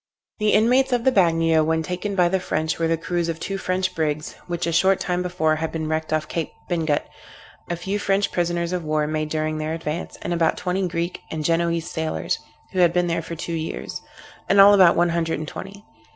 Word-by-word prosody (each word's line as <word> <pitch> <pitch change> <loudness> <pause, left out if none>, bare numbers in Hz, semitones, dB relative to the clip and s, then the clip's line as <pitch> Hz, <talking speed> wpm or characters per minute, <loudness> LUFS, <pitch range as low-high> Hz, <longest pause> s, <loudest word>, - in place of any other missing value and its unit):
The 210 0 +2
inmates 250 +5 +4
of 240 -1 +1
the 265 - +4
Bagnio 165 -5 +3
when 160 +1 +1
taken 180 +4 -3
by 180 -2 +4
the 190 +2 +1
French 160 -3 -2
were 165 - +2
the 165 0 +1
crews 170 +1 -2
of 165 -1 -3
two 195 0 -3
French 185 0 -1
brigs, 155 -2 -2
which 175 -2 -2
a 170 - 0
short 190 +3 +3
time 180 0 -1
before 175 -3 0
had 160 0 -3
been 160 -1 -3
wrecked 155 0 -2
off 155 -1 0
Cape 165 -3 -3 0.2
Bingut, 160 -4 0 0.7
a 175 - 0
few 190 +4 -3
French 195 0 +1
prisoners 175 0 -1
of 180 -2 -2
war 155 -1 0
made 155 0 -2
during 155 0 -1
their 155 +1 -2
advance, 160 +1 -5
and 175 - -1
about 165 -1 +1
twenty 185 +1 -1
Greek, 170 +1 -3
and 155 -1 -4
Genoese 170 0 0
sailors, 160 -1 -2 0.3
who 185 - -1
had 175 -2 +5
been 180 0 +2
there 170 -1 -1
for 165 +1 -7
two 170 +1 -5
years; 160 0 -4 0.5
in 200 - +4
all 200 +1 +9
about 185 -4 +6
one 175 0 +3
hundred 165 -1 0
and 155 +1 -5
twenty. 200 +5 -9
170 Hz, 220 wpm, -23 LUFS, 160-185 Hz, 0.7 s, all